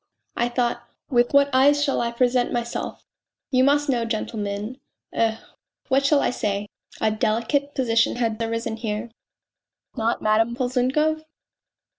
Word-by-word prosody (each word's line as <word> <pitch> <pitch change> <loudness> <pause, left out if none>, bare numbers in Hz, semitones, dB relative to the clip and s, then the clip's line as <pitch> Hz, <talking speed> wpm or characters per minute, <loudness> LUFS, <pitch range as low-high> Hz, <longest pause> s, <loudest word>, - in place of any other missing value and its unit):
I 240 0 +1
thought 240 -1 0 0.3
with 240 -1 +3
what 280 0 +4
eyes 285 +3 +5
shall 280 -2 +1
I 235 - 0
present 245 +1 +1
myself 235 -1 -4 0.5
you 255 -1 +4
must 290 +2 +3
know, 245 -4 +1
gentlemen... 215 +1 -3 0.3
eh, 225 -1 +1 0.5
what 275 +1 +3
shall 285 -1 +4
I - - +1
say? 205 -3 -2 0.3
a 220 - +2
delicate 235 +7 0
position 230 -3 +2
had 230 -2 -1
arisen 230 0 -2
here." 220 0 -4 0.4
" - - -48
Not 230 +1 0
Madame 225 +2 +2
Polzunkov 265 +5 0
240 Hz, 140 wpm, -23 LUFS, 225-265 Hz, 0.5 s, eyes